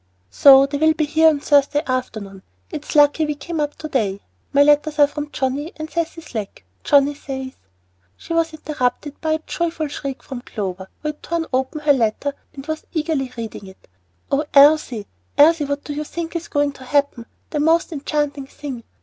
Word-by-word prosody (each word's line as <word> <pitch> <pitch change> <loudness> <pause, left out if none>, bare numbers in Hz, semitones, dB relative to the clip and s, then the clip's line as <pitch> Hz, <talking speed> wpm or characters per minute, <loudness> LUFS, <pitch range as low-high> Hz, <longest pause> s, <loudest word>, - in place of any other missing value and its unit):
"So 275 -1 +8
they 280 +1 -3
will 315 +1 +4
get 310 -2 -1
here 320 +1 +5
on 295 -3 -1
Thursday 290 +1 +3
afternoon. 215 -7 -4 0.3
It's 300 - -6
lucky 295 +1 +5
we 300 - -2
came 325 +3 -5
up 295 -1 -1
to 310 - -7
day. 205 -9 -1 0.3
My 285 +1 +5
letters 295 +1 +3
are 290 - +7
from 295 0 -6
Johnnie 280 +4 -2
and 310 0 -6
Cecy 330 +1 -3
Slack. 220 -10 -7 0.2
Johnnie 285 -1 +4
says 265 -2 -6 0.3
" 90 +1 -42
She - - -6
was 330 -1 +1
interrupted 290 -2 -3
by 315 -1 +1
a 315 - 0
joyful 330 -3 -2
shriek 275 -2 -6
from 260 -3 -7
Clover, 190 -5 -5
who 300 - -1
had 300 - -7
torn 335 -1 -2
open 265 +4 -1
her 295 -1 +5
letter 255 +3 0 0.2
and 275 -1 -8
was 315 0 -5
eagerly 305 -5 -1
reading 225 -3 -6
it. 190 - -16 0.4
"Oh, 280 +2 +2
Elsie, 280 -6 +5 0.3
Elsie, 310 +1 +6
what 285 0 -3
do 295 - -5
you 300 +1 -3
think 335 +2 -6
is 335 0 -3
going 290 -1 +1
to 265 - -14
happen? 275 -3 0 0.2
The 300 - -1
most 325 +3 +2
enchanting 290 -2 -2
thing! 270 -4 -7
290 Hz, 190 wpm, -21 LUFS, 265-310 Hz, 0.4 s, So